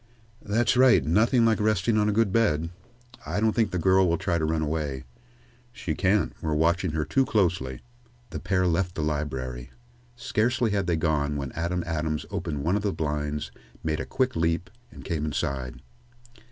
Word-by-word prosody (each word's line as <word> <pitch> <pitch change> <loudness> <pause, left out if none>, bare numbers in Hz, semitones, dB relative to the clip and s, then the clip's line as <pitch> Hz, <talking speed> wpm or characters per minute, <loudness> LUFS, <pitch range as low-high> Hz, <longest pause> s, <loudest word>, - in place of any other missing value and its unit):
"That's 110 +5 +1
right; 125 - +5
nothing 115 - +3
like 110 -2 +3
resting 110 0 +2
on 105 0 +3
a - - +2
good 110 -1 +2
bed. 85 -8 +2 0.5
I 105 - -2
don't 110 +1 +3
think 110 -3 +2
the 90 - -2
girl 95 +1 +4
will 85 - +2
try 85 0 -1
to 80 - 0
run 80 0 0
away," 75 -4 -2 0.7
"She 85 -8 -4
can't 100 +4 +1
we're 80 -1 -1
watching 85 +2 +1
her 80 -1 -1
too 135 - +2
closely." 85 - 0 0.5
The - - -4
pair 90 +1 +1
left 90 +1 0
the 75 - -2
library. 65 -5 -3 0.5
Scarcely 120 0 0
had 100 -3 0
they 85 - +2
gone 75 -2 0
when 70 -3 -4
Adam 85 +1 -2
Adams 80 -2 -2
opened 85 -7 -3
one 85 +6 +1
of 105 - 0
the 100 -1 0
blinds, 75 -2 -3 0.3
made 80 -1 -1
a - - -3
quick 130 -1 0
leap, 85 +2 0 0.2
and - - -13
came 80 -4 -2
inside. 70 -4 -3
85 Hz, 180 wpm, -26 LUFS, 75-105 Hz, 0.7 s, right